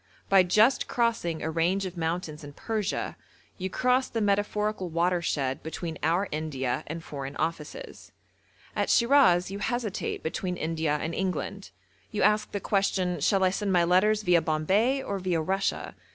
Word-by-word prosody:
By 195 -1 +7
just 215 +9 +3
crossing 230 -9 0
a 160 - -1
range 175 +5 +1
of 185 -1 -6
mountains 165 -2 -3
in 145 0 -9
Persia 215 +4 -3 0.4
you 190 +1 -2
cross 255 +5 +1
the 230 - -2
metaphorical 205 -1 0
watershed 170 -5 0
between 160 0 -5
our 170 +6 +1
India 145 -5 -2
and 165 +2 -6
Foreign 140 -2 -6
Offices. 160 -2 -5 0.6
At - - 0
Shiraz 235 -9 +4
you 200 - -5
hesitate 235 -2 -2
between 180 +3 -3
India 160 -2 -1
and 160 +2 -3
England. 190 +1 -3 0.4
You - - -1
ask 210 +1 +2
the 205 - -2
question, 190 -2 0
'Shall 195 -2 +2
I 185 - +4
send 200 +1 -1
my 175 -1 +4
letters 205 +5 +3
viâ 175 -3 +4
Bombay, 200 - +1
or 200 -1 -3
viâ 175 -4 -1
Russia?' 195 +1 -1
180 Hz, 155 wpm, -27 LUFS, 160-205 Hz, 0.6 s, By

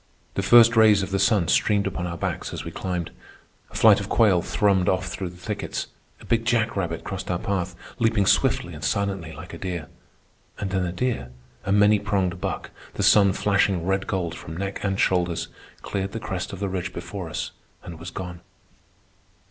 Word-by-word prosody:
The - - -1
first 115 +3 +7
rays 110 -3 +6
of 95 - -5
the 100 - +1
sun 100 -4 +3
streamed 100 +3 +2
upon 95 -2 -3
our 85 -1 -5
backs - - -3
as - - -5
we - - -5
climbed. 90 -3 -3 0.6
A - - -16
flight - - +6
of - - -6
quail 100 -6 +4
thrummed 95 -1 +2
off 95 0 0
through 95 -1 -4
the 90 - -14
thickets. 105 +4 -4 0.3
A - - -14
big 115 -1 +1
jackrabbit 110 -8 0
crossed 95 -1 -5
our 90 - +1
path, 95 -1 -2 0.2
leaping 115 -3 +2
swiftly - - +2
and - - -9
silently 95 -5 -1
like - - -10
a - - -8
deer. 85 -5 -4 0.7
And 100 -2 -4
then 95 -2 0
a - - -3
deer, 90 - -2 0.4
a 100 - -1
many 105 +1 +5
pronged 95 -3 -1
buck, - - -4 0.2
the 100 - -1
sun 100 -1 +6
flashing 100 -3 +1
red 95 +1 0
gold 95 -6 -2
from 80 +1 -8
neck 95 +1 -4
and 95 -1 -1
shoulders, 90 -2 +1 0.3
cleared 95 0 -3
the 115 - -3
crest 95 -4 -4
of 95 - -7
the 100 - -1
ridge 90 -1 -3
before 85 0 -6
us - - -4 0.3
and 85 -2 -9
was 85 +2 -7
gone. 90 0 -7
95 Hz, 195 wpm, -24 LUFS, 90-100 Hz, 0.7 s, first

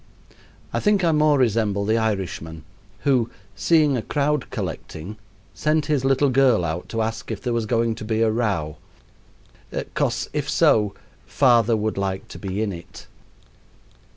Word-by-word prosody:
I - - +1
think 210 -3 +2
I 170 - +4
more 150 -1 +4
resemble 110 -5 +1
the 110 +2 +2
Irishman 95 -7 -3 0.4
who, 125 -5 +2 0.3
seeing 155 -4 +3
a 120 - -1
crowd 145 +2 -1
collecting, 95 +8 -6 0.4
sent 155 0 +1
his 145 -3 0
little 135 +1 +3
girl 125 -8 +4
out 85 +2 -4
to 115 -1 -1
ask 110 +1 -4
if 110 -3 -3
there 120 +3 -2
was 115 -2 -1
going 115 0 +1
to 110 - -8
be 110 +1 0
a 110 - +3
row 95 -10 -1 1.2
"'Cos, - - 0
if - - -2
so, 105 -2 +3 0.3
father 120 -4 +4
would 110 -1 -2
like 95 -1 -3
to - - -9
be 100 +2 -2
in 100 -3 -2
it." 85 0 -11
115 Hz, 155 wpm, -23 LUFS, 100-135 Hz, 1.2 s, I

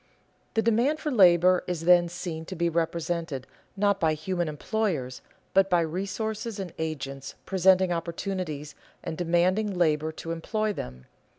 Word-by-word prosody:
The 225 - +2
demand 240 +7 +2
for 300 - -2
labor 180 -4 +5
is 175 -3 -2
then 175 0 +5
seen 170 -2 -5
to 185 - -7
be 170 0 +1
represented 165 -3 -2 0.3
not 200 0 +2
by 160 -1 +2
human 175 +2 -2
employers, 155 - -2 0.3
but 195 0 +4
by 175 -2 +4
resources 200 +6 -3
and 185 -3 -5
agents 135 -4 -4
presenting 190 -1 +4
opportunities 170 -3 -3 0.3
and - - -4
demanding 180 +4 +1
labor 155 -2 +2
to 165 +1 -6
employ 215 +6 -1
them. 65 - -7
175 Hz, 140 wpm, -27 LUFS, 160-195 Hz, 0.3 s, labor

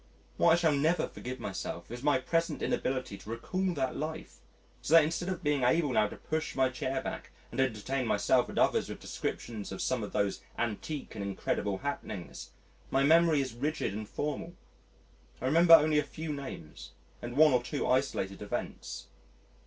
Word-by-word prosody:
What - - +5
I - - +7
shall 170 -2 +3
never 155 +5 +2
forgive 130 +1 -7
myself 85 -2 -5
is 120 0 -6
my 145 0 +3
present 165 +6 -1
inability 130 -6 -1
to - - -12
recall 185 +12 -1
that 130 -2 -1
life, 155 +2 -5 0.4
so 160 - +3
that 165 - +9
instead 170 +4 -2
of 185 - -4
being 145 -2 +1
able 140 +4 +3
now 110 -3 +3
to - - -9
push 160 0 -3
my 130 -1 +3
chair 130 +1 -3
back - - -5 0.2
and 120 - -5
entertain 130 +1 -1
myself - - +2
and - - -7
others - - +3
with - - -6
descriptions 110 -4 -5
of 95 - -6
some 130 -2 0
of 105 - -5
those 100 -1 0 0.2
antique 120 +6 -3
and 105 - -5
incredible 100 0 -1
happenings, 100 -6 -5 0.4
my 135 +1 +2
memory 160 0 +5
is 130 -3 -4
rigid 145 -1 -2
and 105 +1 -5
formal: 150 +4 -4 0.8
I - - -5
remember 165 +5 +8
only 155 -1 +4
a - - +1
few 155 +1 -5
names 135 - -8 0.3
and 120 +2 -6
one 155 -2 +7
or 125 - +4
two 140 +4 -3
isolated 125 -7 0
events. 105 - -5
135 Hz, 180 wpm, -31 LUFS, 115-155 Hz, 0.8 s, that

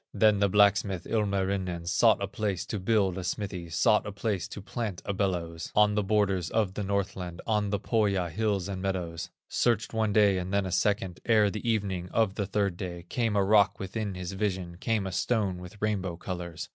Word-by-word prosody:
Then 105 -2 +4
the 100 0 +3
blacksmith, 100 -2 +3
Ilmarinen, 95 -5 -1
Sought 110 +4 +3
a - - -1
place 100 -2 -2
to 105 - -4
build 95 -2 +1
a - - -5
smithy, 90 -3 -4
Sought 90 +6 +3
a - - -4
place 100 -2 -2
to - - -8
plant 100 -1 -4
a 100 - -1
bellows, 85 -4 -2
On 105 0 +5
the 105 - +1
borders 100 -4 +1
of 105 -4 0
the 105 - -3
Northland, 95 -3 -2
On 105 -2 +1
the 100 0 0
Pohya 100 -6 +1
hills 100 -2 0
and 95 -2 -4
meadows; 90 -4 -3 0.2
Searched 115 -2 +1
one 110 -1 +1
day, 100 -2 +4
and 90 +1 -4
then 100 -1 +1
a 95 - -3
second; 100 -4 0
Ere 105 -3 +4
the 110 +3 -3
evening 95 -5 -1
of 110 0 +1
the 100 -2 -2
third 100 -3 0
day, 85 -2 -6
Came 115 -4 0
a 100 - +3
rock 100 0 +4
within 100 0 -4
his 90 0 -5
vision, 95 -3 -2
Came 110 -2 0
a 95 - -3
stone 100 -1 0
with 90 +3 -11
rainbow 95 -5 -1
colors. 85 -2 -5
100 Hz, 200 wpm, -28 LUFS, 90-105 Hz, 0.2 s, On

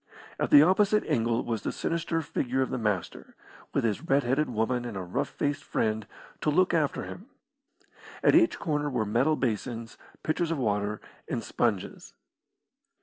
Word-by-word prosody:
At - - 0
the 145 - +9
opposite 205 +4 +3
angle 115 0 +1
was 115 -3 -2
the - - -2
sinister 165 -1 -2
figure 130 -2 -1
of - - -5
the - - -2
Master, 105 -5 -3 0.4
with - - 0
his 110 -3 0
red 140 -3 +2
headed 135 +5 +1
woman 120 +2 0
and 120 -5 -5
a 95 - -4
rough 90 - -2
faced 145 0 -2
friend 110 -1 -1 0.3
to - - 0
look 185 +5 +3
after 155 -4 +1
him. 200 +6 -9 1.0
At - - +5
each 335 0 +5
corner 150 -2 -1
were 125 -5 -1
metal 125 +9 +2
basins, 115 -2 -3 0.2
pitchers 160 +1 0
of 165 - -1
water, 105 -4 -1 0.3
and - - -3
sponges. 100 -5 -2
125 Hz, 165 wpm, -28 LUFS, 110-155 Hz, 1.0 s, the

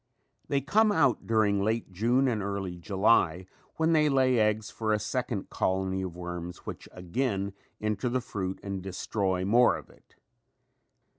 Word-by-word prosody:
They 140 -1 +1
come 210 - +3
out 140 - +2
during 105 -3 +2
late 110 -1 -1
June 120 +8 +2
and 110 -4 0
early 100 -2 -3
July 95 -1 +2 0.3
when 160 +1 +2
they 150 -1 +4
lay 130 -3 +3
eggs 105 0 +1
for 110 -1 -2
a 105 - +3
second 110 -1 -3
colony 95 0 0
of 90 -3 -5
worms 90 0 -6
which - - -7
again 100 +1 -2 0.3
enter 105 +3 -1
the 130 +1 0
fruit 95 -6 -4
and 100 -1 -4
destroy 95 0 -2
more 120 +5 +4
of - - -13
it. - - -25
105 Hz, 155 wpm, -28 LUFS, 95-125 Hz, 0.3 s, they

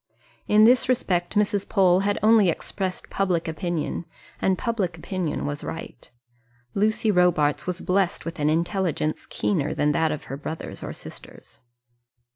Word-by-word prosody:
In 210 +1 +5
this 250 +2 +5
respect 180 -7 0
Mrs. 205 -1 +1
Pole 185 -2 +4
had 200 +1 0
only 215 -3 +6
expressed 185 +3 -4
public 180 -4 0
opinion, 170 0 -3 0.4
and 190 -1 +2
public 195 -8 -2
opinion 175 -1 -3
was 145 0 -4
right. 165 - -8 0.6
Lucy 215 +1 +2
Robarts 175 -6 +2
was 180 0 -3
blessed 185 -1 0
with 165 -1 -6
an 150 0 +2
intelligence 170 -1 -1
keener 155 -8 -1
than 150 0 +2
that 160 +2 +1
of 150 - -4
her 135 - -6
brothers 160 +3 -6
or - - -5
sisters. - - -12
180 Hz, 145 wpm, -24 LUFS, 160-200 Hz, 0.6 s, only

